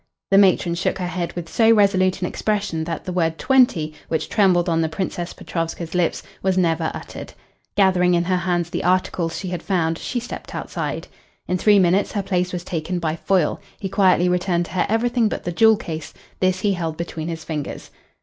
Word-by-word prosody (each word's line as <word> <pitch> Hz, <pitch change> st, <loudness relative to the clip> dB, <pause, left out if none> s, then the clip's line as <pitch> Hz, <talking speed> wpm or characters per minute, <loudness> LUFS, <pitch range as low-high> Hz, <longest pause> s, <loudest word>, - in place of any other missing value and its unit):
The 195 Hz, -, +7 dB
matron 185 Hz, -3 st, +4 dB
shook 175 Hz, +2 st, -1 dB
her 185 Hz, -, -3 dB
head 175 Hz, -1 st, -3 dB
with 175 Hz, -2 st, -6 dB
so 225 Hz, +6 st, +3 dB
resolute 190 Hz, -3 st, +3 dB
an -, -, +1 dB
expression 200 Hz, -7 st, -2 dB
that 165 Hz, -2 st, -5 dB
the 185 Hz, -, -4 dB
word 165 Hz, -2 st, 0 dB
"twenty," 245 Hz, -, +3 dB
which 160 Hz, -1 st, -2 dB
trembled 185 Hz, -5 st, +3 dB
on 165 Hz, -1 st, +2 dB
the 160 Hz, -, 0 dB
Princess 175 Hz, +1 st, -3 dB
Petrovska's 165 Hz, 0 st, -4 dB
lips, 180 Hz, -2 st, 0 dB, 0.2 s
was 190 Hz, -1 st, +1 dB
never 165 Hz, -3 st, +1 dB
uttered. -, -, -8 dB, 0.4 s
Gathering 180 Hz, -3 st, +4 dB
in 170 Hz, -, +2 dB
her 185 Hz, +1 st, +1 dB
hands 175 Hz, -1 st, -1 dB
the -, -, -2 dB
articles 180 Hz, -2 st, 0 dB
she 190 Hz, -, -4 dB
had 175 Hz, -2 st, -4 dB
found, 165 Hz, -4 st, 0 dB
she 245 Hz, -, -3 dB
stepped 245 Hz, -, -8 dB
outside. -, -, -4 dB, 0.4 s
In 180 Hz, 0 st, 0 dB
three 210 Hz, +1 st, +5 dB
minutes 190 Hz, +1 st, +3 dB
her 205 Hz, -, -1 dB
place 180 Hz, -2 st, 0 dB
was 180 Hz, -1 st, -4 dB
taken 175 Hz, +1 st, -3 dB
by 160 Hz, -2 st, -1 dB
Foyle. 180 Hz, -2 st, +1 dB, 0.2 s
He 195 Hz, -, -4 dB
quietly 185 Hz, -2 st, +3 dB
returned 180 Hz, -1 st, +1 dB
to -, -, -12 dB
her 185 Hz, -, 0 dB
everything 235 Hz, +1 st, +2 dB
but -, -, -4 dB
the 175 Hz, -, -3 dB
jewel 220 Hz, +4 st, +5 dB
case. 160 Hz, -7 st, -7 dB, 0.2 s
This 185 Hz, 0 st, +1 dB
he 205 Hz, -2 st, +2 dB
held 165 Hz, -3 st, -3 dB
between 165 Hz, -2 st, -5 dB
his 165 Hz, -1 st, -5 dB
fingers. 150 Hz, -3 st, -5 dB
180 Hz, 200 wpm, -22 LUFS, 165-195 Hz, 0.4 s, The